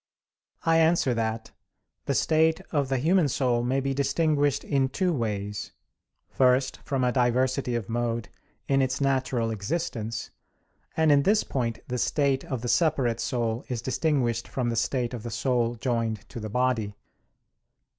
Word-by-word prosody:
I 165 0 +4
answer 160 -5 +3
that, 110 -1 -2 0.5
The - - 0
state 160 0 +3
of 140 -3 0
the 135 - +1
human 165 +5 +3
soul 125 -3 +1
may 130 +3 0
be 135 0 -1
distinguished 145 0 +1
in 135 -2 +1
two 180 +5 0
ways. 105 -5 -3 0.5
First, 130 +1 +2
from 135 -2 -1
a 125 - +2
diversity 125 0 +1
of 115 -5 -3
mode 115 -1 -2 0.4
in 135 0 +3
its 130 0 0
natural 130 -4 0
existence; 115 - -3 0.7
and 160 -1 +4
in 140 -1 +5
this 210 +8 +3
point 120 -4 -2
the 125 0 -2
state 140 0 +1
of 130 -8 -4
the - - -2
separate 125 -2 +2
soul 115 0 -1
is 120 -3 -3
distinguished 130 -3 0
from 125 -2 -2
the - - -2
state 120 +1 -1
of 120 - -5
the 120 - -6
soul 120 +1 0
joined 115 -2 -2
to - - -7
the 110 -1 -5
body. 115 -3 0
125 Hz, 155 wpm, -26 LUFS, 115-140 Hz, 0.7 s, in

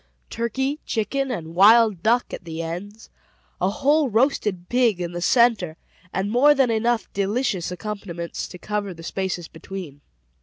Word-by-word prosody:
Turkey, 265 +6 -2
chicken, 270 +5 -1
and 165 -9 -5
wild 210 0 +6
duck, 235 +5 +1
at - - -6
the 165 -1 -7
ends; 200 +7 -7 0.5
a 185 - +3
whole 285 +6 +2
roasted 215 -6 +1
pig 240 -6 +2
in 175 -1 -3
the 175 0 -5
centre, 205 -5 +3 0.3
and 190 +2 -2
more 285 +5 +5
than 265 -4 +3
enough 230 +1 +1
delicious 200 -3 -1
accompaniments 180 -2 -5
to 180 - -10
cover 205 -1 -3
the 165 - -11
spaces 180 -1 -3
between. 160 -4 -9
205 Hz, 150 wpm, -23 LUFS, 175-240 Hz, 0.5 s, wild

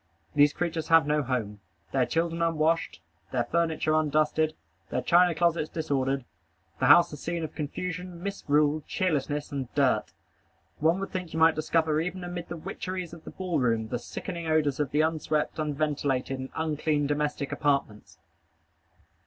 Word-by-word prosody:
These 145 0 +5
creatures 165 -2 -2
have 165 -2 +6
no 150 0 +2
home. 115 -6 -2 0.3
Their 130 -2 +2
children 165 +1 -1
unwashed. 165 - +1 0.3
Their 125 -2 +1
furniture 160 +3 0
undusted. 155 0 +2 0.3
Their - - -2
china 175 0 +5
closets 165 -2 +1
disordered. 135 -4 -1 0.5
The - - +2
house 175 - +7
a - - -6
scene 165 +3 -3
of 155 - -5
confusion, 180 +3 -5
misrule, 150 -6 +1
cheerlessness, 150 -4 -1
and 135 -4 -4
dirt. 130 -7 +2 0.7
One 165 +4 +3
would 195 - -4
think 180 -3 -5
you 160 - -2
might 160 0 +6
discover 155 0 +1
even 180 +2 -4
amid 175 -1 -6
the 170 - -5
witcheries 185 0 -5
of 165 -2 -12
the - - -6
ball 185 -4 -2
room 115 -3 +1
the 120 - -2
sickening 170 +6 -6
odors 150 -3 +2
of 145 -3 0
the 150 +3 +2
unswept, 155 -1 0
unventilated, 145 -3 -1
and 130 0 -5
unclean 155 -2 0
domestic 145 -1 -1
apartments. 140 -8 -1
155 Hz, 155 wpm, -28 LUFS, 145-170 Hz, 0.7 s, house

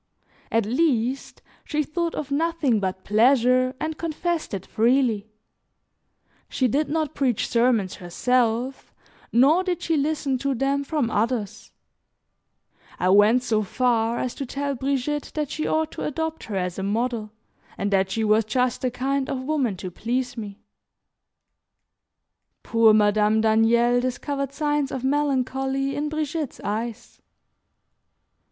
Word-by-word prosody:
At 225 -2 +2
least, 255 0 0 0.2
she 300 0 -1
thought 335 +3 -2
of 290 -2 -5
nothing 305 -6 +1
but 190 -1 -3
pleasure 255 +3 +3
and 315 0 -4
confessed 335 -1 -2
it 195 -3 -5
freely; 230 -2 +1 1.2
she 260 - +1
did 290 +6 0
not 310 0 -1
preach 255 -6 0
sermons 230 -5 +1
herself, 245 +7 -1 0.4
nor 285 +10 +4
did 360 -3 -2
she 330 - +1
listen 285 -2 0
to 275 +1 -1
them 275 +3 0
from 280 -5 -1
others; 220 -1 -2 1.3
I 180 - +1
went 210 +6 +5
so 220 -3 +1
far 230 +2 0
as 250 - -2
to 275 - -5
tell 280 +2 -2
Brigitte 275 +2 -2
that 300 -2 -2
she 310 - -2
ought 315 0 0
to - - -6
adopt 320 +2 -3
her 210 - -5
as 180 -1 -2
a - - -2
model, 220 +2 -1 0.5
and 200 +1 -2
that 190 -1 +2
she 220 +3 -1
was 215 +1 +3
just 250 +3 0
the 255 - +1
kind 265 +2 -2
of 260 -1 -3
woman 260 -8 -1
to 180 0 -6
please 245 +6 -2
me. 210 -3 -8 2.0
Poor 230 -1 +4
Madame 210 0 +3
Daniel 230 +2 +3
discovered 275 +2 -3
signs 295 -1 -1
of 260 - -4
melancholy 270 -1 0
in 295 +1 -2
Brigitte's 310 -1 -3
eyes. 225 +3 -5
255 Hz, 135 wpm, -24 LUFS, 225-285 Hz, 2.0 s, went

